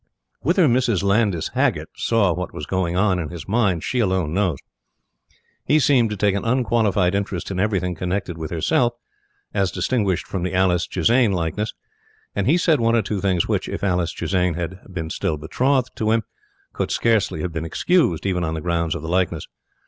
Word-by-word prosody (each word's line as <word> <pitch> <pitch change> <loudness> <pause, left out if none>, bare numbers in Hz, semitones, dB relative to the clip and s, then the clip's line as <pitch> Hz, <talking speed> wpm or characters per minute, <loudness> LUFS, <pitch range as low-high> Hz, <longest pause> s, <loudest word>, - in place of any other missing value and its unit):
Whether 175 +4 +3
Mrs. 120 -6 +2
Landys 100 -4 +1
Haggert - - 0
saw 105 -6 +2
what 90 +1 -5
was 75 - -5
going 90 0 -1
on 95 -2 +2
in 80 -3 -4
his 85 -4 -8
mind, 100 -6 +1
she 125 - -1
alone 95 -7 0
knows. 90 -6 +1 1.1
He 150 - +3
seemed 130 -6 +3
to 105 - -4
take 100 0 +2
an 100 - -2
unqualified 110 -6 +2
interest 100 -2 -2
in 95 - -3
everything 95 -3 0
connected 90 +1 -3
with 80 -2 -5
herself, 120 +8 +1 0.6
as 95 -2 +1
distinguished 95 -1 0
from 95 - -4
the 90 +1 -2
Alice 90 -3 +2
Chisane 120 -3 +2
likeness, 90 +5 -2 0.6
and 100 +1 0
he 155 +6 +4
said 165 -4 +3
one 115 0 +2
or 115 - +2
two 100 0 -3
things 95 -4 +1
which, - - -1
if - - -5
Alice 90 -4 +1
Chisane 90 -3 0
had 90 +2 -4
been 80 -3 -4
still 90 -6 -1
betrothed 130 - 0
to 110 - 0
him, 115 0 +2 0.5
could - - -2
scarcely 110 -8 +1
have 85 0 -3
been 80 -1 -3
excused, 90 - +1
even 90 -3 0
on 80 0 -2
the - - -3
grounds 85 -1 -1
of 80 - -6
the - - -5
likeness. 85 -3 0
95 Hz, 190 wpm, -22 LUFS, 85-110 Hz, 1.1 s, he